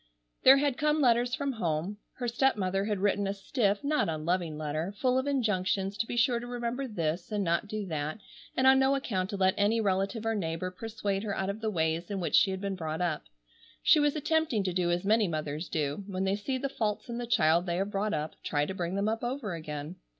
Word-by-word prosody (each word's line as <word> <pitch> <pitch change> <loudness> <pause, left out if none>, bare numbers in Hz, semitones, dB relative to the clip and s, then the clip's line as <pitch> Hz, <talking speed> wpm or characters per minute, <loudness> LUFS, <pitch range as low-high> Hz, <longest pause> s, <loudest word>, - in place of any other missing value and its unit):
There 265 +1 +8
had 280 -2 0
come 300 +1 +2
letters 245 -2 +3
from 280 -1 -1
home. 180 -3 -2 0.2
Her 245 - -4
stepmother 205 -6 +1
had 210 -1 0
written, 205 0 +1
a 195 - -2
stiff, 205 0 0
not 295 - +1
unloving 160 0 -1
letter, 155 +5 -3
full 255 +4 +2
of 260 - -3
injunctions 200 -7 0
to 225 - 0
be 240 - -4
sure 240 0 +3
to 240 - -7
remember 245 +2 -3
this, 175 -3 -2
and 205 -1 0
not 170 +3 0
do 215 0 -4
that, 155 -1 -3 0.4
and 260 - +3
on 265 0 +7
no 265 +1 +4
account 195 -9 -2
to 205 - -3
let 190 -1 +3
any 210 +3 +3
relative 200 +2 0
or 225 - +1
neighbor 185 -2 -2
persuade 205 0 -3
her 205 -2 -3
out 190 +1 0
of 210 +2 -9
the 220 - 0
ways 165 -2 -1
in 200 -1 -2
which 175 - -3
she 200 - +6
had 190 0 -3
been 200 -1 -2
brought 160 -3 -4
up. 175 -4 -1 0.6
She 310 - +6
was 295 0 +2
attempting 305 -7 +1
to 185 -2 -1
do 175 -1 +1
as 175 +2 0
many 215 0 +4
mothers 155 0 -3
do, 150 +4 -2
when 190 -1 -2
they 195 +1 +1
see 260 +6 -2
the 275 +2 -2
faults 215 -6 -2
in 235 0 -4
the 240 - -4
child 170 -3 +3
they 170 - 0
have 195 +2 -1
brought 205 0 0
up, 155 +1 -3
try 145 -1 0
to 190 - -4
bring 175 0 -3
them 200 +1 0
up 225 +2 -1
over 240 -5 -3
again. 155 +1 -6
200 Hz, 235 wpm, -29 LUFS, 175-235 Hz, 0.6 s, There